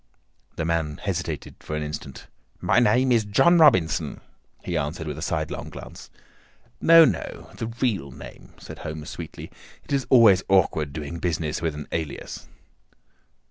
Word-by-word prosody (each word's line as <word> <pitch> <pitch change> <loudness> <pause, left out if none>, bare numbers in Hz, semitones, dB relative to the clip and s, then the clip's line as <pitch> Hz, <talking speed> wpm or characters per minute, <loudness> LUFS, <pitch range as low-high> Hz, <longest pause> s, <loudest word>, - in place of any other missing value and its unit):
The 80 - -2
man 80 -2 -1
hesitated 90 -6 -4
for 75 - -6
an 75 - -2
instant. 75 -3 -7 0.3
"My - - +3
name 125 +3 +3
is 115 -2 +4
John 170 +12 +4
Robinson," 95 - +3 0.4
he - - -3
answered 80 +3 -2
with 75 -1 -5
a - - -7
sidelong 80 -3 -3
glance. - - -11 0.7
"No, 165 0 +8
no; - - -4
the 115 - -3
real 115 - -2
name," 65 - -12
said - - -11
Holmes 75 -1 -6
sweetly. - - -8 0.3
"It - - -6
is 135 -2 0
always 110 -8 +7
awkward 80 -6 +2
doing 75 +3 -6
business 80 -3 -2
with 80 -3 -1
an 75 0 -7
alias." 80 -4 -5
85 Hz, 150 wpm, -24 LUFS, 75-115 Hz, 0.7 s, No